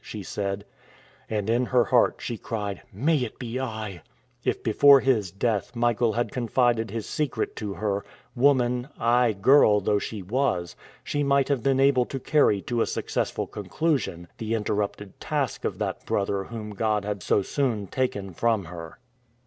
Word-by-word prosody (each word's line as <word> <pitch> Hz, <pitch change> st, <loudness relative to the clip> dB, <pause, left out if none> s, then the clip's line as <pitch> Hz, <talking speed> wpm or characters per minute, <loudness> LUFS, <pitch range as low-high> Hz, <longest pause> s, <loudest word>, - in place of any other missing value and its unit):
she 105 Hz, -2 st, -7 dB
said. 100 Hz, +1 st, -3 dB, 0.6 s
And 105 Hz, -2 st, -2 dB
in 120 Hz, +2 st, +2 dB
her 125 Hz, -1 st, +4 dB
heart, 125 Hz, -2 st, +3 dB
she 120 Hz, -, -4 dB
cried, 105 Hz, -3 st, -4 dB
"May 155 Hz, +3 st, +1 dB
it 125 Hz, -5 st, -3 dB
be 120 Hz, 0 st, -4 dB
I!" 110 Hz, -8 st, -5 dB, 0.4 s
If -, -, -1 dB
before 140 Hz, -1 st, +7 dB
his 115 Hz, -8 st, +2 dB
death 105 Hz, +3 st, -1 dB
Michael 120 Hz, -1 st, +2 dB
had 120 Hz, +2 st, -1 dB
confided 120 Hz, -2 st, +1 dB
his 110 Hz, +1 st, -4 dB
secret 150 Hz, -3 st, -2 dB
to 105 Hz, -2 st, -4 dB
her, 100 Hz, -2 st, -1 dB, 0.3 s
woman, 125 Hz, -1 st, +2 dB
aye 120 Hz, 0 st, +3 dB
girl 105 Hz, 0 st, +5 dB
though 105 Hz, +1 st, +1 dB
she 105 Hz, -1 st, -5 dB
was, 95 Hz, -5 st, -1 dB, 0.3 s
she 145 Hz, -, -2 dB
might 140 Hz, -1 st, +2 dB
have 140 Hz, -4 st, +1 dB
been 135 Hz, 0 st, +2 dB
able 135 Hz, -2 st, +4 dB
to 135 Hz, -, -5 dB
carry 125 Hz, -8 st, +2 dB
to 120 Hz, -1 st, -1 dB
a -, -, +1 dB
successful -, -, -2 dB
conclusion 105 Hz, -, -2 dB
the 115 Hz, 0 st, -1 dB
interrupted 105 Hz, -2 st, -3 dB
task -, -, -2 dB
of -, -, -2 dB
that -, -, -3 dB
brother 100 Hz, -1 st, 0 dB
whom 110 Hz, -1 st, -7 dB
God 105 Hz, 0 st, 0 dB
had 105 Hz, -2 st, -3 dB
so 100 Hz, -, +2 dB
soon 120 Hz, -4 st, -1 dB
taken 100 Hz, -5 st, -2 dB
from 110 Hz, 0 st, +1 dB
her. 85 Hz, -1 st, -9 dB
115 Hz, 165 wpm, -26 LUFS, 100-125 Hz, 0.6 s, before